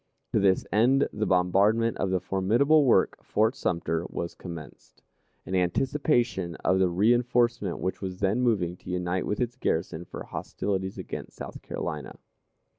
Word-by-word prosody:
To -, -, +4 dB
this 95 Hz, -1 st, +3 dB
end 125 Hz, +6 st, +4 dB
the 110 Hz, +1 st, -1 dB
bombardment 100 Hz, +5 st, +3 dB
of 95 Hz, -, -1 dB
the 95 Hz, 0 st, +1 dB
formidable 115 Hz, -, +3 dB
work, 125 Hz, -, +3 dB
Fort 110 Hz, +4 st, +1 dB
Sumter, 85 Hz, -, -1 dB
was 85 Hz, -, -4 dB
commenced, 85 Hz, -6 st, -11 dB, 0.4 s
in 95 Hz, -, -6 dB
anticipation 110 Hz, -, +1 dB
of 95 Hz, +1 st, +3 dB
the 95 Hz, -1 st, +3 dB
reënforcement 120 Hz, +1 st, +2 dB
which 95 Hz, -, -3 dB
was 95 Hz, -1 st, -5 dB
then 100 Hz, +5 st, +1 dB
moving 95 Hz, -8 st, +1 dB
to -, -, -12 dB
unite 90 Hz, 0 st, -1 dB
with 105 Hz, -, -2 dB
its 120 Hz, 0 st, -1 dB
garrison 85 Hz, -5 st, -2 dB
for -, -, -8 dB
hostilities 95 Hz, -1 st, -3 dB
against -, -, -7 dB
South -, -, -8 dB
Carolina. 75 Hz, -4 st, -5 dB
95 Hz, 150 wpm, -27 LUFS, 90-120 Hz, 0.4 s, To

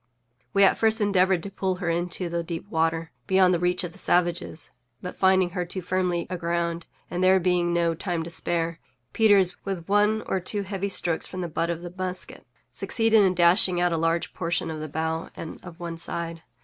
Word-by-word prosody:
We 200 Hz, -1 st, +4 dB
at 195 Hz, -, +4 dB
first 220 Hz, 0 st, +3 dB
endeavored 190 Hz, -3 st, +2 dB
to 200 Hz, -, -4 dB
pull 190 Hz, -1 st, -1 dB
her 180 Hz, -1 st, -5 dB
into 175 Hz, +2 st, -1 dB
the 170 Hz, 0 st, -2 dB
deep 165 Hz, +2 st, -6 dB
water, 165 Hz, 0 st, 0 dB, 0.2 s
beyond 190 Hz, -1 st, +4 dB
the 175 Hz, -, +1 dB
reach 180 Hz, +1 st, 0 dB
of 175 Hz, -, -5 dB
the 195 Hz, -, -15 dB
savages, 175 Hz, -3 st, -1 dB, 0.3 s
but, 180 Hz, -, -7 dB
finding 190 Hz, -1 st, +3 dB
her 180 Hz, -1 st, -2 dB
too 180 Hz, +1 st, -6 dB
firmly 180 Hz, -1 st, -1 dB
aground, 170 Hz, -1 st, -2 dB, 0.2 s
and 180 Hz, +1 st, -1 dB
there 190 Hz, +1 st, +5 dB
being 175 Hz, -1 st, +1 dB
no 170 Hz, -1 st, +1 dB
time 170 Hz, 0 st, -3 dB
to 170 Hz, -, -8 dB
spare, 165 Hz, 0 st, -2 dB, 0.3 s
Peters, 200 Hz, -5 st, +5 dB
with 190 Hz, -4 st, -5 dB
one 210 Hz, +2 st, +2 dB
or 190 Hz, -, -1 dB
two 200 Hz, +3 st, +2 dB
heavy 195 Hz, 0 st, -3 dB
strokes 170 Hz, -3 st, 0 dB
from 185 Hz, -, -6 dB
the 175 Hz, -, -2 dB
butt 165 Hz, +1 st, -2 dB
of 170 Hz, 0 st, -3 dB
the 175 Hz, 0 st, -8 dB
musket, 185 Hz, -1 st, -5 dB, 0.2 s
succeeded 225 Hz, -1 st, +2 dB
in 185 Hz, -1 st, +2 dB
dashing 175 Hz, +1 st, +4 dB
out 175 Hz, -1 st, +2 dB
a -, -, 0 dB
large 165 Hz, +1 st, 0 dB
portion 170 Hz, -1 st, -1 dB
of 155 Hz, -, -5 dB
the 155 Hz, 0 st, -6 dB
bow 160 Hz, +2 st, -3 dB
and 160 Hz, -, -8 dB
of 175 Hz, -1 st, -11 dB
one 170 Hz, -1 st, -5 dB
side. 165 Hz, -1 st, -5 dB
175 Hz, 205 wpm, -25 LUFS, 170-190 Hz, 0.3 s, there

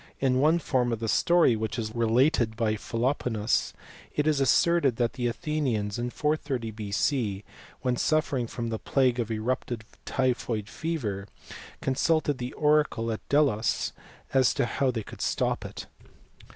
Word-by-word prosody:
In 130 Hz, -1 st, +2 dB
one 155 Hz, +4 st, +4 dB
form 130 Hz, -7 st, 0 dB
of 115 Hz, -, -2 dB
the 115 Hz, -, -3 dB
story, 170 Hz, +1 st, +4 dB
which 110 Hz, +1 st, -3 dB
is 110 Hz, -2 st, -3 dB
related 120 Hz, +1 st, +2 dB
by 110 Hz, -1 st, +1 dB
Philoponus, 115 Hz, -1 st, 0 dB, 0.4 s
it 150 Hz, -, +1 dB
is 155 Hz, -2 st, +2 dB
asserted 140 Hz, +1 st, +3 dB
that 120 Hz, 0 st, 0 dB
the 125 Hz, -1 st, -1 dB
Athenians 120 Hz, -6 st, -1 dB
in 120 Hz, +1 st, -1 dB
430 140 Hz, -5 st, -1 dB
B.C., 105 Hz, 0 st, -1 dB, 0.4 s
wnen 125 Hz, -1 st, +1 dB
suffering 145 Hz, -6 st, +1 dB
from 115 Hz, 0 st, -4 dB
the 110 Hz, -1 st, -3 dB
plague 130 Hz, -3 st, +1 dB
of 115 Hz, -2 st, -1 dB
eruptive 115 Hz, +1 st, -2 dB, 0.2 s
typhoid 120 Hz, -5 st, -1 dB
fever, 110 Hz, -12 st, -3 dB, 0.5 s
consulted 145 Hz, +1 st, +1 dB
the 125 Hz, +1 st, -4 dB
oracle 150 Hz, -6 st, +2 dB
at 110 Hz, -, -4 dB
Delos 140 Hz, -7 st, +2 dB, 0.4 s
as 130 Hz, -2 st, +4 dB
to -, -, +2 dB
how 130 Hz, +2 st, 0 dB
they 115 Hz, -3 st, -2 dB
could -, -, -10 dB
stop -, -, 0 dB
it. -, -, -7 dB
125 Hz, 150 wpm, -27 LUFS, 115-140 Hz, 0.5 s, one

